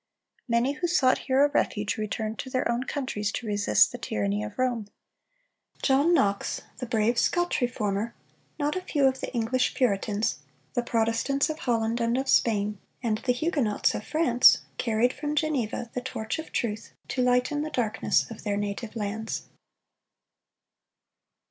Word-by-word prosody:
Many 235 Hz, +3 st, +2 dB
who 350 Hz, +5 st, -2 dB
sought 280 Hz, -7 st, +3 dB
here 265 Hz, +2 st, +5 dB
a -, -, +1 dB
refuge 210 Hz, -7 st, 0 dB
returned 215 Hz, 0 st, -3 dB
to 260 Hz, -, -5 dB
their 255 Hz, 0 st, 0 dB
own 235 Hz, +2 st, -1 dB
countries 210 Hz, -9 st, -2 dB
to 240 Hz, -, -4 dB
resist 205 Hz, -, +3 dB
the -, -, -7 dB
tyranny 100 Hz, 0 st, -1 dB
of 105 Hz, -, -7 dB
Rome. 245 Hz, -5 st, 0 dB, 1.0 s
John 280 Hz, +5 st, +4 dB
Knox, 200 Hz, -12 st, +1 dB, 0.2 s
the 250 Hz, -, -4 dB
brave 230 Hz, 0 st, +2 dB
Scotch 350 Hz, -4 st, +1 dB
Reformer, 220 Hz, -2 st, -1 dB, 0.4 s
not 295 Hz, 0 st, 0 dB
a 370 Hz, -, -2 dB
few 290 Hz, -6 st, +1 dB
of 265 Hz, 0 st, +2 dB
the -, -, -5 dB
English 250 Hz, +1 st, 0 dB
Puritans, 210 Hz, -3 st, 0 dB, 0.3 s
the 245 Hz, -, +1 dB
Protestants 235 Hz, +5 st, +1 dB
of 310 Hz, -, -7 dB
Holland 230 Hz, -1 st, 0 dB
and 230 Hz, +1 st, +1 dB
of 270 Hz, +1 st, -1 dB
Spain, 210 Hz, -5 st, +2 dB, 0.2 s
and 220 Hz, -2 st, 0 dB
the 250 Hz, -, +1 dB
Huguenots 250 Hz, -, +1 dB
of -, -, -4 dB
France, 255 Hz, -5 st, +5 dB, 0.2 s
carried 235 Hz, +1 st, +2 dB
from 295 Hz, +2 st, -3 dB
Geneva 260 Hz, -7 st, -1 dB
the 250 Hz, -, -2 dB
torch 220 Hz, +2 st, -4 dB
of 315 Hz, -, -7 dB
truth 220 Hz, -2 st, -3 dB, 0.2 s
to 255 Hz, -, -1 dB
lighten 250 Hz, +4 st, +2 dB
the 310 Hz, -, -3 dB
darkness 235 Hz, -7 st, +1 dB
of 225 Hz, -, -8 dB
their 205 Hz, -2 st, -1 dB
native 205 Hz, +3 st, -4 dB
lands. 220 Hz, +1 st, -3 dB
235 Hz, 160 wpm, -27 LUFS, 215-265 Hz, 1.0 s, here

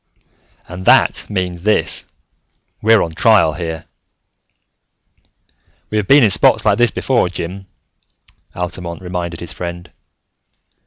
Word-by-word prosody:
"And 90 Hz, +2 st, -9 dB
that -, -, +3 dB
means 90 Hz, -4 st, -3 dB
this: 105 Hz, +3 st, 0 dB, 0.7 s
we're 110 Hz, 0 st, +4 dB
on 80 Hz, -, -5 dB
trial 90 Hz, -2 st, +3 dB
here!" 80 Hz, -1 st, -6 dB, 2.1 s
"We 110 Hz, -, -1 dB
have 100 Hz, -, -4 dB
been 140 Hz, +3 st, +6 dB
in 105 Hz, -, +4 dB
spots -, -, +4 dB
like -, -, +2 dB
this 120 Hz, -1 st, +4 dB
before, 120 Hz, -7 st, 0 dB
Jim," 95 Hz, +2 st, -7 dB, 0.9 s
Altamont 90 Hz, -1 st, -6 dB
reminded 90 Hz, -2 st, -5 dB
his 85 Hz, -, -7 dB
friend. 85 Hz, 0 st, -7 dB
90 Hz, 115 wpm, -17 LUFS, 85-105 Hz, 2.1 s, been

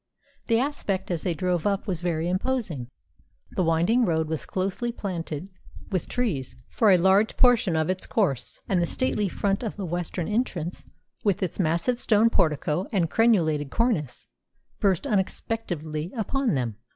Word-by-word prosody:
The 230 Hz, -, +3 dB
aspect 210 Hz, -9 st, -1 dB
as 170 Hz, -3 st, -1 dB
they 175 Hz, -3 st, -1 dB
drove 180 Hz, +2 st, 0 dB
up 200 Hz, -1 st, 0 dB
was 180 Hz, -6 st, -2 dB
very 170 Hz, -2 st, -1 dB
imposing. 185 Hz, -, -1 dB, 0.6 s
The -, -, -1 dB
winding 170 Hz, +9 st, +3 dB
road 160 Hz, -6 st, +1 dB
was 160 Hz, -1 st, -3 dB
closely 195 Hz, +6 st, -2 dB
planted 175 Hz, -6 st, -4 dB, 0.4 s
with 185 Hz, -4 st, -1 dB
trees 195 Hz, -, -2 dB, 0.2 s
for 220 Hz, -, +3 dB
a 185 Hz, -, +7 dB
large 190 Hz, +4 st, +3 dB
portion 235 Hz, -9 st, +4 dB
of 160 Hz, -1 st, +1 dB
its 185 Hz, 0 st, -2 dB
course, 140 Hz, -, -1 dB
and 185 Hz, -3 st, +2 dB
the 170 Hz, -, +1 dB
stately 210 Hz, -4 st, 0 dB
front 200 Hz, +3 st, 0 dB
of 225 Hz, -4 st, -4 dB
the 200 Hz, -, -4 dB
western 175 Hz, 0 st, -3 dB
entrance, 190 Hz, -7 st, -2 dB, 0.4 s
with 200 Hz, -1 st, +1 dB
its 180 Hz, -, -3 dB
massive 175 Hz, +8 st, +1 dB
stone 225 Hz, 0 st, +4 dB
portico 155 Hz, 0 st, +1 dB
and 175 Hz, -7 st, +1 dB
crenulated 165 Hz, -11 st, +3 dB
cornice, 215 Hz, -, -1 dB, 0.5 s
burst 190 Hz, -4 st, +2 dB
unexpectedly 180 Hz, -6 st, -2 dB
upon 245 Hz, -, 0 dB
them. 120 Hz, -5 st, -2 dB
185 Hz, 155 wpm, -26 LUFS, 160-215 Hz, 0.6 s, a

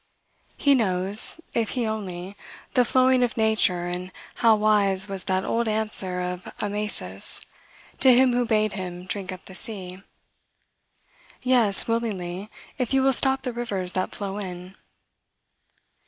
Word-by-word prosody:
He 280 Hz, -, +4 dB
knows, 200 Hz, -, +2 dB
if 230 Hz, -2 st, 0 dB
he 240 Hz, -, 0 dB
only, 195 Hz, -3 st, -5 dB, 0.4 s
the 250 Hz, -, +4 dB
flowing 255 Hz, +1 st, +3 dB
of 245 Hz, -1 st, 0 dB
nature 215 Hz, -5 st, +1 dB
and 180 Hz, +1 st, -5 dB, 0.3 s
how 225 Hz, -2 st, +5 dB
wise 205 Hz, -2 st, +2 dB
was 195 Hz, -2 st, -4 dB
that 190 Hz, 0 st, 0 dB
old 235 Hz, 0 st, 0 dB
answer 215 Hz, -4 st, +1 dB
of 180 Hz, 0 st, -5 dB
Amasis 205 Hz, -, -1 dB, 0.6 s
to 265 Hz, -, +6 dB
him 250 Hz, 0 st, +5 dB
who 245 Hz, 0 st, +2 dB
bade 215 Hz, -2 st, +1 dB
him 180 Hz, -2 st, -6 dB
drink 190 Hz, 0 st, -2 dB
up 185 Hz, 0 st, -10 dB
the 190 Hz, -, -12 dB
sea, 185 Hz, -2 st, -5 dB, 1.4 s
"Yes, 240 Hz, -6 st, +5 dB
willingly, 205 Hz, -4 st, -3 dB, 0.3 s
if 250 Hz, +1 st, -1 dB
you 265 Hz, -, +3 dB
will 270 Hz, 0 st, +3 dB
stop 265 Hz, 0 st, +3 dB
the 250 Hz, -2 st, -3 dB
rivers 200 Hz, -7 st, -3 dB
that 185 Hz, 0 st, -3 dB
flow 200 Hz, 0 st, -5 dB
in." 180 Hz, -1 st, -8 dB
205 Hz, 140 wpm, -24 LUFS, 185-235 Hz, 1.4 s, to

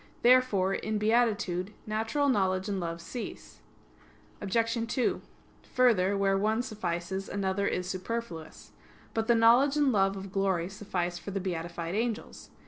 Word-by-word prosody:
Therefore, 240 Hz, -7 st, +4 dB
in 215 Hz, +1 st, -2 dB
beatitude, 210 Hz, -4 st, +1 dB
natural 225 Hz, +7 st, 0 dB
knowledge 190 Hz, -6 st, +1 dB
and 200 Hz, -2 st, -2 dB
love 170 Hz, -1 st, -4 dB
cease. 235 Hz, +7 st, -8 dB, 0.8 s
Obj. 230 Hz, +3 st, 0 dB
2: 250 Hz, -, 0 dB, 0.5 s
Further, 205 Hz, -6 st, +4 dB
where 195 Hz, 0 st, +2 dB
one 220 Hz, +4 st, +1 dB
suffices, 190 Hz, -4 st, -4 dB
another 200 Hz, 0 st, -1 dB
is 180 Hz, 0 st, -2 dB
superfluous. 185 Hz, -3 st, -5 dB, 0.4 s
But 225 Hz, 0 st, -1 dB
the 235 Hz, -, +5 dB
knowledge 245 Hz, +6 st, +5 dB
and 290 Hz, -3 st, +3 dB
love 195 Hz, -2 st, +2 dB
of 190 Hz, 0 st, -7 dB
glory 190 Hz, -3 st, 0 dB
suffice 180 Hz, -4 st, -3 dB
for -, -, -8 dB
the 195 Hz, 0 st, -2 dB
beatified 170 Hz, -2 st, -4 dB
angels. 225 Hz, +1 st, -3 dB
200 Hz, 135 wpm, -29 LUFS, 185-230 Hz, 0.8 s, the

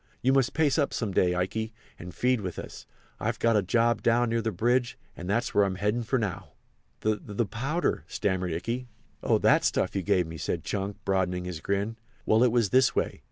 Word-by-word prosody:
You 130 Hz, +2 st, +4 dB
must 135 Hz, -3 st, +2 dB
pace 150 Hz, -2 st, +2 dB
up 145 Hz, -, 0 dB
some 110 Hz, -4 st, -2 dB
day, 90 Hz, -1 st, +2 dB
Ikey, 110 Hz, +5 st, -2 dB, 0.3 s
and 90 Hz, -, -8 dB
feed 125 Hz, +3 st, +1 dB
with 90 Hz, -3 st, -5 dB
us. -, -, -8 dB, 0.3 s
I've -, -, -1 dB
got 115 Hz, -1 st, +2 dB
a 105 Hz, -, +4 dB
job 115 Hz, +4 st, +2 dB
down 120 Hz, 0 st, +3 dB
near 115 Hz, 0 st, +1 dB
the 110 Hz, 0 st, -1 dB
bridge, 120 Hz, +2 st, +1 dB, 0.2 s
and 90 Hz, -, -7 dB
that's 120 Hz, +5 st, 0 dB
where 105 Hz, -, +5 dB
I'm 95 Hz, -1 st, 0 dB
heading 105 Hz, +5 st, 0 dB
for 120 Hz, +3 st, 0 dB
now." 100 Hz, -6 st, -4 dB, 0.5 s
"The—the—powder?" 110 Hz, -, -1 dB
stammered 95 Hz, -2 st, -1 dB
Ikey. 115 Hz, +10 st, -3 dB, 0.3 s
"Oh, -, -, +3 dB
that -, -, +4 dB
stuff -, -, 0 dB
you 95 Hz, -, +1 dB
gave 90 Hz, 0 st, +2 dB
me!" 80 Hz, 0 st, -8 dB
said -, -, -2 dB
Chunk, 100 Hz, 0 st, -3 dB
broadening 90 Hz, -2 st, 0 dB
his 90 Hz, -3 st, -5 dB
grin; 100 Hz, +5 st, -1 dB, 0.3 s
"well, 110 Hz, +1 st, +4 dB
it 125 Hz, -, +4 dB
was 115 Hz, -5 st, +2 dB
this 130 Hz, 0 st, +4 dB
way. -, -, -1 dB
110 Hz, 205 wpm, -27 LUFS, 95-120 Hz, 0.5 s, where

